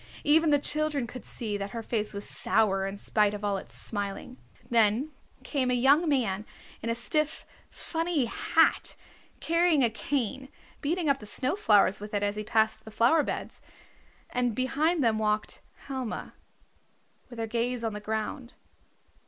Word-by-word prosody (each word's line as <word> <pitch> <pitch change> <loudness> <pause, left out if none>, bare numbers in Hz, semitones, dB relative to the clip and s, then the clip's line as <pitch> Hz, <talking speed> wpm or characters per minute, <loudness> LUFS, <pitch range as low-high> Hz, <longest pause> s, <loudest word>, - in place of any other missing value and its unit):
Even 315 +2 +4
the 290 - +5
children 295 -2 0
could 250 +2 -9
see 215 -4 -2
that 200 0 -4
her 230 - -4
face 215 -2 -2
was 200 0 -3
sour 195 -3 +2
in 195 +1 -5
spite 210 0 +2
of 205 0 -5
all 200 -1 0
its - - -8
smiling. 205 +4 -2 0.3
Then 230 +6 +3 0.3
came 265 -4 0
a 250 - +2
young 280 +7 +4
man 215 -8 0 0.4
in 230 - -3
a 230 - +1
stiff, 305 +6 -1 0.2
funny 330 -4 -1
hat, 230 - +2 0.5
carrying 335 -4 +3
a 235 - +3
cane, 265 +1 -2 0.3
beating 325 +3 -1
up 280 -1 +2
the 210 - -10
snow 260 - 0
flowers 205 - +4
with 210 +1 -6
it 205 - 0
as 205 0 0
he 210 - -4
passed 220 +1 +1
the - - -10
flower 235 +8 +4
beds. - - -5 0.7
And 245 -2 0
behind 295 +6 +1
them 220 -2 +2
walked 215 0 -1 0.2
Helma, 260 -4 -5 1.0
with 240 - -11
her 225 - -2
gaze 235 +2 -2
on 225 -2 -1
the 210 - -5
ground. 220 +4 -4
235 Hz, 165 wpm, -28 LUFS, 210-285 Hz, 1.0 s, the